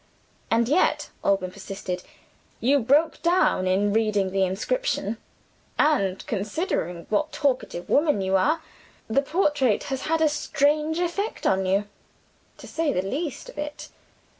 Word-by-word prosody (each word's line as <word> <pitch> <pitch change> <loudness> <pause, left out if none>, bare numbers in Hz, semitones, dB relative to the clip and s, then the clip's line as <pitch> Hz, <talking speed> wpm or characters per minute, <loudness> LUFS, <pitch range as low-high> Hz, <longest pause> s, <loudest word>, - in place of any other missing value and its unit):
"And 230 0 +2
yet," 305 +8 +2
Alban 195 -2 +1
persisted, 185 -2 -5 0.6
"you 280 +4 +3
broke 290 +7 +2
down 340 - +2
in 200 +2 +2
reading 210 -3 +1
the 195 0 +2
inscription: 220 - -1 0.6
and 200 -12 +2
considering 205 - -2
what 300 +9 +1
talkative 255 - -1
woman 295 -6 +3
you 190 0 +1
are, 310 - +2 0.4
the 245 +5 +2
portrait 295 - +1
has 265 - -4
had 325 0 +2
a 320 - +4
strange 300 +1 +1
effect 355 +5 -2
on 190 0 +2
you 200 +2 +1 0.7
to - - -12
say 325 -3 0
the 185 - 0
least 280 - -4
of - - -10
it." 295 0 -6
260 Hz, 140 wpm, -25 LUFS, 195-305 Hz, 0.7 s, a